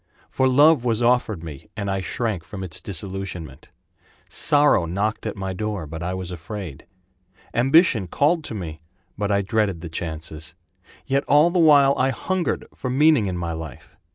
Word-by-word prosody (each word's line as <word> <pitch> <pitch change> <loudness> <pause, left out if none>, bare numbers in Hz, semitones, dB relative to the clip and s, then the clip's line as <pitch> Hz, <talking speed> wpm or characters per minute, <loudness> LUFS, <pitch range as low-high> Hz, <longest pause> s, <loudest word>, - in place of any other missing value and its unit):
For 130 - +2
love 145 +1 +5
was 120 -1 0
offered 120 -7 +1
me 75 -5 -9
and 100 -2 -3
I 95 0 -1
shrank 105 -3 -2
from 95 +2 -8
its 85 -4 -5
disillusionment; 95 -6 -5 0.6
Sorrow 145 -11 +3
knocked 105 +6 -2
at 110 - -4
my 95 -2 -4
door, 105 -3 -3
but 80 +2 -7
I 90 +2 -2
was 90 -1 -5
afraid; 85 -3 -7 0.7
Ambition 130 - +4
called 155 - +1
to 115 - -6
me, 80 -5 -6 0.3
but 105 0 -2
I 100 0 +2
dreaded 100 -4 0
the 85 - -7
chances. 80 -1 -6 0.5
Yet 140 0 +1
all 150 +4 +5
the 180 - +1
while 145 -4 +6
I 130 - +3
hungered 185 +6 -2
for 130 - -5
meaning 140 -4 +4
in 90 -2 -3
my 85 -1 -3
life. 80 -5 -8
100 Hz, 170 wpm, -23 LUFS, 85-130 Hz, 0.7 s, while